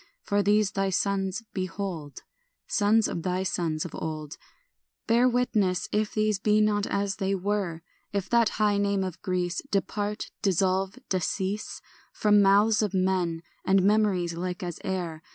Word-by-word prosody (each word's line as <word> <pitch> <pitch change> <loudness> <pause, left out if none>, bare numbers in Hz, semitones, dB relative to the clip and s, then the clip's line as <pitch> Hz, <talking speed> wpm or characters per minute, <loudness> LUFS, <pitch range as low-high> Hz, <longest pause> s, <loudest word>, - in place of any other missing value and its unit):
For 205 0 +1
these 205 0 +3
thy 195 -1 0
sons, 195 +1 -1
behold, 185 -6 -5 0.4
Sons 215 +1 +3
of 170 - -3
thy 185 +1 -1
sons 165 -4 -1
of 170 - -7
old, 155 -1 -5 0.7
Bear 240 +3 +4
witness 215 -7 +1
if 210 0 -1
these 215 -2 +1
be 210 +1 +3
not 210 -1 +2
as 200 -1 -1
they 195 0 0
were; 190 -4 -2 0.3
If 200 -2 -2
that 235 -2 +4
high 210 -1 +2
name 200 -1 +1
of 185 -3 -5
Greece 180 -3 -1
Depart, 205 +1 -2
dissolve, 190 0 +1
decease 190 +3 -2 0.3
From 210 -1 +4
mouths 205 +3 +4
of 205 -2 -1
men 185 -3 0 0.2
and 190 0 +3
memories 200 -4 +2
like 180 +1 -4
as 175 -2 -5
air. 175 -4 -3
195 Hz, 150 wpm, -27 LUFS, 180-210 Hz, 0.7 s, Bear